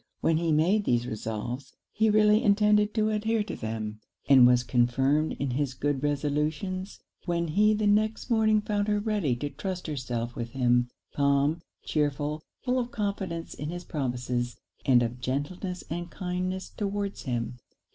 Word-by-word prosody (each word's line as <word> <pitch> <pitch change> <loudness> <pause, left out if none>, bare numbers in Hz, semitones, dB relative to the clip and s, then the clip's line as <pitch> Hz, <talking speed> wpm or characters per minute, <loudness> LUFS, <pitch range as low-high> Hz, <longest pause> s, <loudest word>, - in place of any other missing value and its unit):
When 165 - +3
he 165 0 0
made 180 +7 +3
these 120 0 +2
resolves, 120 +4 -5 0.2
he 220 +1 +2
really 210 +1 +5
intended 210 0 +4
to 215 -1 +2
adhere 220 +1 +1
to 210 - -6
them; 110 -1 -4 0.3
and 130 -3 +8
was 125 0 +4
confirmed 130 +5 +2
in 140 -2 -2
his 130 0 -1
good 145 -1 -1
resolutions 150 +6 -1 0.3
when 170 -1 0
he 210 +6 +4
the 210 0 0
next 215 +2 +2
morning 215 -2 +4
found 210 -1 -1
her 210 0 +2
ready 205 - 0
to 145 +4 -4
trust 180 +5 -5
herself 120 -5 -3
with 115 -1 -5
him, 125 -1 +2 0.3
calm, 140 +3 +2 0.2
chearful, 150 0 -1 0.2
full 255 0 +1
of 240 -1 -2
confidence 195 -7 -3
in 150 - -5
his 175 +1 -5
promises, 125 -4 -2 0.3
and 125 -3 +6
of 120 +1 -3
gentleness 145 +9 -3
and 175 +1 -4
kindness 185 0 -3
towards 200 -2 -3
him. 120 -1 -3
155 Hz, 155 wpm, -28 LUFS, 130-205 Hz, 0.3 s, and